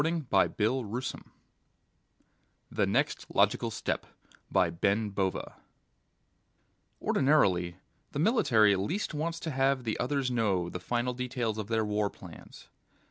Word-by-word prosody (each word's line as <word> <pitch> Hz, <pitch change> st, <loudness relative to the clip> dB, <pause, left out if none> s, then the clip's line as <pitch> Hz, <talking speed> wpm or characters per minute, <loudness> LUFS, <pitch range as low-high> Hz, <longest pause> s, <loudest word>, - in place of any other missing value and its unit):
net 160 Hz, -4 st, -2 dB, 0.3 s
THE 120 Hz, +2 st, -1 dB, 1.7 s
NEXT -, -, 0 dB
LOGICAL -, -, +3 dB
STEP -, -, -3 dB, 2.9 s
Ordinarily 95 Hz, -, +2 dB, 0.4 s
the -, -, -5 dB
military 120 Hz, -, +4 dB
least 165 Hz, -, -2 dB
wants 165 Hz, +3 st, -2 dB
to 160 Hz, -, -3 dB
have 135 Hz, -1 st, +1 dB
the 110 Hz, -2 st, -2 dB
others 130 Hz, 0 st, 0 dB
know 100 Hz, -7 st, +1 dB
the 90 Hz, -, -5 dB
final 120 Hz, +6 st, -1 dB
details 120 Hz, -3 st, -2 dB
of 105 Hz, -, -4 dB
their 110 Hz, -1 st, +1 dB
war 105 Hz, -1 st, 0 dB
plans. 85 Hz, -4 st, -13 dB
120 Hz, 100 wpm, -30 LUFS, 105-140 Hz, 2.9 s, military